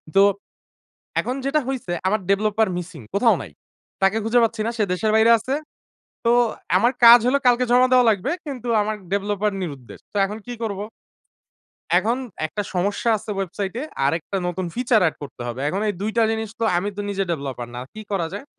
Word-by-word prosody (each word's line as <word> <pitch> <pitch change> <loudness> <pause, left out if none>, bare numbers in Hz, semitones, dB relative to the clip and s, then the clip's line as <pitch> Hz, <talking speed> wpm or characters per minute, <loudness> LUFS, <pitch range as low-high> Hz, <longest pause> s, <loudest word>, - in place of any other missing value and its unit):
তো 195 - +7 1.0
এখন 250 - -1
যেটা 285 +3 +2
হইছে 260 -9 -3 0.2
আমার 215 +3 +2
developer 215 +2 +2
missing 175 -6 -7
কোথাও 230 +3 +4
নাই। - - -9 0.5
তাকে 195 +3 +3
খুঁজে 225 +3 +3
পাচ্ছি 225 -1 0
না। - - 0
সে 215 - +2
দেশের 215 +4 0
বাইরে 220 +1 +5
আছে। 260 +5 -3 0.7
তো 230 - +3 0.5
আমার 235 +6 +3
কাজ 235 +1 +11
হলো 265 +3 +3
কালকে 245 0 +4
জমা 250 +1 +6
দেওয়া 250 -1 +6
লাগবে। 215 +5 -1 0.2
কিন্তু 250 -4 -6
আমার 215 +1 -2 0.2
developer 205 +1 0
নিরুদ্দেশ। 140 -8 -8
তো - - -8
এখন 210 +2 -4
কী 245 - -5
করব? 200 -3 -3 1.2
এখন 220 +7 +2 0.3
একটা 205 +7 -4
সমস্যা 200 +5 0
আছে 210 - -8
ওয়েবসাইটে। 195 +3 -3 0.2
আরেকটা 165 +7 -1
নতুন 180 +1 -3
ফিচার 240 -2 +2
এড - - -7
করতে 140 -3 -8
হবে। 120 +2 -5
এখন 190 +6 -2
এই 205 - -1
২ 210 +2 -1
টা 230 - +4
জিনিস 220 0 -2
তো - - +1
আমি 185 +4 0
তো - - -3
নিজে 195 -1 -1
ডেভেলপার 135 -6 -4
না। 120 - -5
কী 215 - -8
করা 180 -4 0
যায়? 200 +6 -6
210 Hz, 185 wpm, -22 LUFS, 185-230 Hz, 1.2 s, কাজ